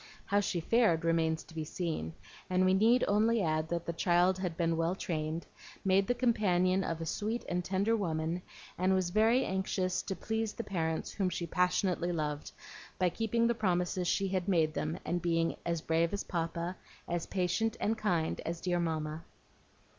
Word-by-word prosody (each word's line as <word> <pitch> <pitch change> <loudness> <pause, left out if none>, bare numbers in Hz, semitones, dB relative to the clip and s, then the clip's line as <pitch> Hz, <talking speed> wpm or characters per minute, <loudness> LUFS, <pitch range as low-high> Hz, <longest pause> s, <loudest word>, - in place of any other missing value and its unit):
How 205 - +2
she 185 -3 -1
fared 180 -5 +3
remains 165 -1 +1
to - - -16
be 160 -1 -3
seen; 155 - -3 0.4
and 185 0 +3
we 185 - +4
need 225 +6 +4
only 215 +1 +3
add 155 -1 0
that 170 0 -2
the 170 - -2
child 175 +2 +3
had 180 -3 -3
been 165 -1 +1
well 165 +2 0
trained, 160 -3 -3 0.4
made 195 +1 +3
the 245 - +1
companion 190 -6 +2
of 165 -2 -3
a - - -2
sweet 215 +8 -2
and 180 0 -1
tender 195 +5 +1
woman, 165 -3 -1 0.4
and 185 +1 +3
was 185 -2 0
very 225 +6 +4
anxious 190 -1 -1
to 195 - -4
please 220 0 -2
the 230 - -5
parents 160 -6 -2
whom 195 -3 0
she 175 - -3
passionately 180 +1 +1
loved, 150 -3 -3 0.5
by 180 -1 +3
keeping 225 +5 0
the 235 - +3
promises 180 -3 0
she 195 +2 +1
had 185 -1 -1
made 165 -5 +2
them, 155 +1 -2
and 175 0 -1
being 165 -1 +1
"as 170 -2 0
brave 165 +2 +1
as 200 - -2
Papa, 170 +1 -3 0.3
as 170 -1 -2
patient 215 +5 0
and 220 - +1
kind 180 -7 0
as 170 0 -3
dear 175 -1 0
Mamma." 155 -1 -2
180 Hz, 185 wpm, -32 LUFS, 165-195 Hz, 0.5 s, we